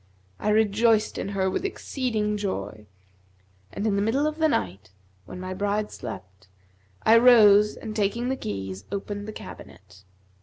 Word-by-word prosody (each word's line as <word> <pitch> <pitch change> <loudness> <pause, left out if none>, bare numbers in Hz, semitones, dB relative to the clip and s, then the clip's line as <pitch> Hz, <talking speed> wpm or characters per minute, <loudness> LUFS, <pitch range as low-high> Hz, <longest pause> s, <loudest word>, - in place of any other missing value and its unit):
I 210 - -1
rejoiced 215 +1 +2
in - - -3
her 195 -1 0
with 190 - -2
exceeding 240 - -2
joy; 105 - -5 0.8
and 200 - -4
in 210 -2 +1
the - - +1
middle 240 +8 +1
of 305 +1 -2
the 315 - +4
night, 95 - -2 0.4
when - - -8
my 185 0 -5
bride 205 +2 -1
slept, 95 +1 -9 0.6
I 230 +1 +6
rose 210 -4 +6
and, 215 -1 -7
taking 220 +4 0
the 265 - 0
keys, 95 - -6
opened 205 +1 -5
the - - -5
cabinet. 95 - -12
205 Hz, 155 wpm, -25 LUFS, 180-225 Hz, 0.8 s, I